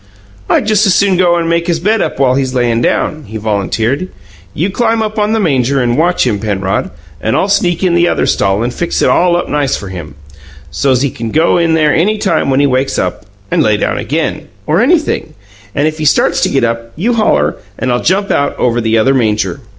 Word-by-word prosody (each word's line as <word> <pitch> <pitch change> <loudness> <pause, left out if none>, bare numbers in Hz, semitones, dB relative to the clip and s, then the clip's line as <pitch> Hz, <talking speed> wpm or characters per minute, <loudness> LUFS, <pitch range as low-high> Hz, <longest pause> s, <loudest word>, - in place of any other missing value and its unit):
"I - - +3
just 215 0 +2
as 190 - +3
soon 195 -2 +3
go 175 -1 +3
and 170 -1 -1
make 170 +1 0
his 170 -2 0
bed 215 +5 +1
up - - -2
while 130 -2 +2
he's 130 -1 -1
layin' 120 -2 +1
down," 150 +4 -1
he 110 +1 -7
volunteered. 110 - -1 0.4
"You 180 +6 -2
climb 225 +1 0
up 215 0 -3
on 210 +1 +1
the 225 - +1
manger 140 - +1
and 120 -2 +1
watch 170 +3 +1
him, 110 -5 0
Penrod, 100 -3 -2 0.3
and - - 0
I'll - - +1
sneak 185 -3 0
in 180 -2 +2
the 170 0 +3
other - - 0
stall 100 +2 +1
and 120 +1 -2
fix 175 - -2
it - - +3
all 175 0 +3
up 175 - -3
nice 145 -2 0
for 100 - -8
him, 85 -7 -8 0.6
so's 130 -2 +1
he 140 - 0
can 115 -1 -5
go 160 +6 +2
in 165 -1 +2
there 155 -2 +2
any 210 +6 +1
time 190 -8 0
when 135 0 +2
he 145 - +3
wakes 135 0 0
up, - - -3 0.2
and - - +2
lay - - +2
down - - -1
again, - - -3 0.2
or 165 +6 +1
anything; 310 +5 0 0.4
and 145 - +1
if 155 0 -4
he 155 - -2
starts 150 - +2
to - - +2
get 135 - 0
up, 115 0 -2
you 225 +10 0
holler 80 - +1 0.2
and 130 - -1
I'll 120 - 0
jump 195 +3 0
out 140 - 0
over 120 -1 0
the 110 0 +1
other 130 +5 +3
manger." 110 0 0
145 Hz, 230 wpm, -13 LUFS, 120-180 Hz, 0.6 s, I